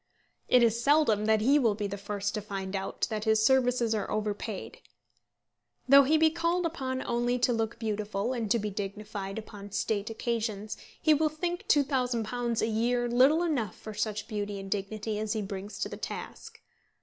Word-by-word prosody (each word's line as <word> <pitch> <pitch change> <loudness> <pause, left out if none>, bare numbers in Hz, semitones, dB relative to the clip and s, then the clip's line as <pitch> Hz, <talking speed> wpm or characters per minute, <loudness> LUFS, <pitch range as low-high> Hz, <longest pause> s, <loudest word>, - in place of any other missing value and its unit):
It 250 -1 +5
is 230 0 +2
seldom 280 -7 +3
that 220 0 +3
he 275 +6 +4
will 225 -6 +2
be 210 0 -3
the 200 0 -3
first 205 0 -3
to 210 - -2
find 195 -1 -5
out 195 0 -2
that 215 0 -2
his 220 0 +3
services 250 -2 +3
are 210 -2 -2
overpaid. 215 - -3 1.1
Though 275 +1 +8
he 310 +4 +4
be 315 0 +4
called 340 +2 0
upon 265 -6 -3
only 240 +1 0
to 245 0 +2
look 225 0 -2
beautiful 215 +1 -2
and 230 -4 -2
to 235 - +4
be 210 -1 -3
dignified 200 0 -5
upon 205 -2 -9
State 205 +1 -1
occasions, 220 -2 -3 0.2
he 310 - +4
will 310 +1 +2
think 345 +3 -4
£2000 245 -4 +1
a - - +4
year 240 +2 +1
little 265 +8 +4
enough 255 - -1
for 215 - -9
such 215 0 -2
beauty 205 -1 -3
and 195 0 -8
dignity 210 +1 -2
as 215 0 -1
he 220 - -2
brings 200 +1 -6
to - - 0
the - - -7
task. - - -7
220 Hz, 185 wpm, -29 LUFS, 210-250 Hz, 1.1 s, Though